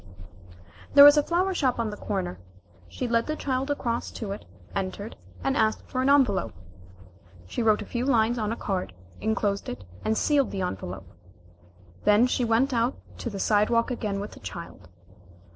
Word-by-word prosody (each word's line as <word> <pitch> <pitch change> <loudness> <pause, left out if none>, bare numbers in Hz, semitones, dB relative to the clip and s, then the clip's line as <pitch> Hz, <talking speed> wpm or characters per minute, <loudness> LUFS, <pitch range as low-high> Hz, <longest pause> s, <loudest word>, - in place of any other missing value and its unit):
There 285 - +11
was 290 +1 +10
a 295 - +5
flower 360 +5 0
shop 265 -8 +1
on 230 -2 -1
the - - -6
corner. 190 - -3 0.5
She 255 - -4
led 230 0 +1
the 310 - -1
child 265 -1 -2
across 240 -5 -2
to 215 -4 -5
it, 200 - -7 0.3
entered, 195 +2 -4 0.3
and 270 - +1
asked 220 -5 +1
for 255 - -2
an 265 - +2
envelope. 245 - +3 0.9
She 95 - -4
wrote 215 -2 +3
a - - -11
few 240 +3 -3
lines 240 -2 +2
on 215 -1 -1
a - - -1
card, 185 - -3 0.3
enclosed 210 -2 -1
it 120 -5 -6 0.2
and 220 0 0
sealed 285 -3 +2
the 195 - -4
envelope. 95 - -5 1.0
Then 210 +3 +5
she 255 0 0
went 240 +4 +2
out 235 +2 +1 0.2
to 235 - -3
the 205 - -6
side 210 +1 +2
walk 230 +1 +2
again 210 -5 -2
with 205 +1 -5
the - - -13
child. 170 - -9
230 Hz, 180 wpm, -26 LUFS, 200-255 Hz, 1.0 s, There